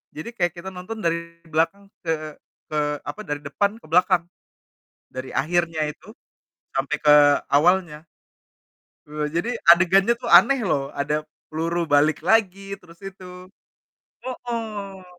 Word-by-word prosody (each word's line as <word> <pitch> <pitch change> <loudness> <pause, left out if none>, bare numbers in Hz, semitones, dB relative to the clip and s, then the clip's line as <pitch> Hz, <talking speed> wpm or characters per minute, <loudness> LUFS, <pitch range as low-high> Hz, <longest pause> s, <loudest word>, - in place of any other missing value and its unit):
jadi 155 +9 -6
kayak 175 -4 +1
kita 175 +2 -7
nonton 190 +4 -8
dari 170 0 +1 0.2
belakang 165 +5 -1 0.2
ke 165 - -1 0.6
ke, 155 - -1 0.3
apa, 145 +9 -6
dari 145 -1 -3
depan 170 +9 0
ke - - -18
belakang, 180 0 +4 0.8
dari 130 0 -7
akhirnya 165 +1 0
itu, - - -21 0.6
sampai 140 +3 -1
ke 150 -1 +7 0.4
awalnya. 160 0 +2 1.0
Eee, 150 0 -3
jadi 175 +7 0 0.2
adegannya 190 +5 +4
tuh 240 - -4
aneh, 275 -1 +7
loh. 155 -8 +1 0.2
Ada 145 +1 -1 0.4
peluru 165 +2 -2
balik 150 +2 +4
lagi, 195 -3 +3 0.2
terus 170 -1 -18
itu 190 -1 -11 1.0
hooh. 210 -7 -6
175 Hz, 125 wpm, -23 LUFS, 155-195 Hz, 1.0 s, ke